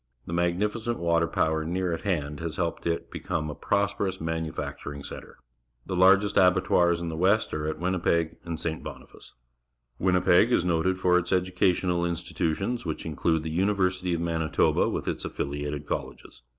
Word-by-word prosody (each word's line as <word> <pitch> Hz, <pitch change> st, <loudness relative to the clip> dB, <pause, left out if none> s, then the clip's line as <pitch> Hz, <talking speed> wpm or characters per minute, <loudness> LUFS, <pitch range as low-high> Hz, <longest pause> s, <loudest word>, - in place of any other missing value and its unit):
The 85 Hz, -, -6 dB
magnificent 105 Hz, +7 st, 0 dB
water 85 Hz, -1 st, +2 dB
power 80 Hz, 0 st, 0 dB
near 90 Hz, +2 st, -1 dB
at 80 Hz, -, -4 dB
hand 75 Hz, -7 st, -2 dB
has 85 Hz, -2 st, -4 dB
helped 85 Hz, -1 st, -2 dB
it 85 Hz, 0 st, -1 dB
to -, -, -33 dB
become 75 Hz, -1 st, -3 dB
a -, -, -5 dB
prosperous 100 Hz, -1 st, -1 dB
manu 80 Hz, -1 st, -2 dB
facturing 70 Hz, -1 st, -6 dB
centre. -, -, -9 dB, 0.5 s
The 95 Hz, -, -3 dB
largest 95 Hz, +3 st, +5 dB
abattoirs 90 Hz, -2 st, +4 dB
in 85 Hz, -1 st, -3 dB
the 80 Hz, -, -4 dB
West 95 Hz, +6 st, +2 dB
are 75 Hz, 0 st, -2 dB
at 80 Hz, -, -2 dB
Winnipeg 85 Hz, -2 st, 0 dB
and 85 Hz, -1 st, -5 dB
St. 80 Hz, -1 st, -3 dB
Bonihice. -, -, -11 dB, 0.7 s
Winnipeg 90 Hz, +4 st, +4 dB
is 90 Hz, -, +3 dB
noted 90 Hz, +2 st, +1 dB
for 90 Hz, -1 st, +3 dB
its 85 Hz, -, -5 dB
educational 90 Hz, -1 st, +1 dB
institutions, 85 Hz, +5 st, -2 dB
which 80 Hz, -3 st, -4 dB
include 80 Hz, 0 st, 0 dB
the 80 Hz, -, -4 dB
University 90 Hz, 0 st, +1 dB
of 85 Hz, -, -3 dB
Manitoba 80 Hz, -2 st, +1 dB
with -, -, -3 dB
its -, -, -2 dB
affiUated 75 Hz, +1 st, -4 dB
colleges. -, -, -6 dB
85 Hz, 165 wpm, -27 LUFS, 80-95 Hz, 0.7 s, largest